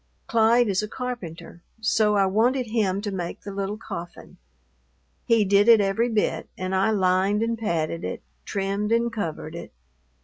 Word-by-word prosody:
Clyde 230 +1 +3
is 195 -1 +1
a 210 - -4
carpenter; 210 -10 -7 0.2
so 215 -1 +2
I 200 -1 +4
wanted 240 +7 +2
him 210 -4 0
to 205 -1 -3
make 175 -3 -5
the 200 - -7
little 200 +1 -3
coffin. 175 -5 -9 0.9
He 230 -3 +3
did 200 +2 +4
it 230 -2 +8
every 205 +4 +1
bit, 220 -2 -1
and 185 0 -3
I 190 +3 +2
lined 195 +1 +2
and 230 0 0
padded 165 -6 -2
it, - - -5 0.2
trimmed 200 +1 -2
and 235 0 +1
covered 165 -6 -4
it. 170 - -8
205 Hz, 165 wpm, -24 LUFS, 190-225 Hz, 0.9 s, it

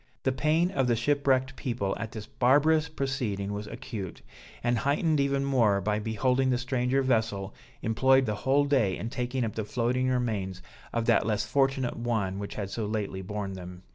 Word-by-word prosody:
The 130 - +2
pain 155 +7 +2
of 135 -6 +1
the 120 - +3
shipwrecked 135 +1 +1
people 105 -6 -2
at 115 -1 -4
this 110 -2 -7
barbarous 145 +5 +3
proceeding 120 -9 -2
was 105 +1 -5
acute, 105 -4 -7 0.4
and 120 -1 +2
heightened 150 +3 +1
even 140 0 +1
more 115 -8 +3
by 105 +2 0
beholding 125 +5 +1
the 125 - +2
stranger 125 +1 0
vessel 110 -6 0 0.3
employed 130 +4 +4
the 105 - -1
whole 135 +7 +2
day 125 -10 +2
in 115 - -5
taking 125 0 -1
up 110 - -4
the 110 - -3
floating 125 +4 0
remains 105 -7 -1 0.3
of 115 -1 -1
that 115 -1 +3
less 105 -1 0
fortunate 135 +1 +1
one 110 -5 -1
which 100 - -6
had 100 -2 -4
so 110 -1 -2
lately 105 -3 -3
borne 100 0 -4
them. 90 -1 -9
120 Hz, 180 wpm, -28 LUFS, 105-135 Hz, 0.4 s, employed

